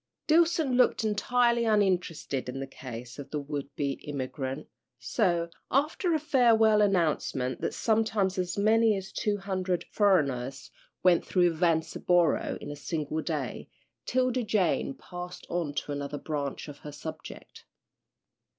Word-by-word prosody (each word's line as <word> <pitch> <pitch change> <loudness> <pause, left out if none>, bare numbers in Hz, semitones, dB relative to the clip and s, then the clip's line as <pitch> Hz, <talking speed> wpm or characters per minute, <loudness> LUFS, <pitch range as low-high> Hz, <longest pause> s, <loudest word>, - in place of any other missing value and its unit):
Dillson 320 -5 +3
looked 250 -2 +3
entirely 235 +3 +2
uninterested 180 - 0
in 135 - -5
the 135 - -3
case 125 -2 -9
of 140 -1 -8
the 150 - -2
would 140 -1 -5
be 140 -2 -2
immigrant, 135 0 -4 0.3
so, 170 - 0 0.2
after 310 +5 +1
a - - +1
farewell 225 -7 +4
announcement 155 - +1
that - - -2
sometimes 215 -4 +1
as 180 +1 -2
many 220 +1 +4
as 190 0 -7
two 210 -1 -1
hundred 185 -2 -2
"furriners" 135 - +1 0.3
went 180 -2 +5
through 175 -2 +2
Vanceboro 165 0 +1
in - - -7
a - - -6
single 150 +2 -3
day, 150 -7 -4 0.4
'Tilda 255 0 +1
Jane 200 - 0
passed 180 0 -8
on 170 -4 -1
to 145 - -3
another 145 0 -4
branch 145 -2 -4
of 145 -1 -10
her 150 - -8
subject. 155 +2 -9
175 Hz, 135 wpm, -28 LUFS, 145-215 Hz, 0.4 s, went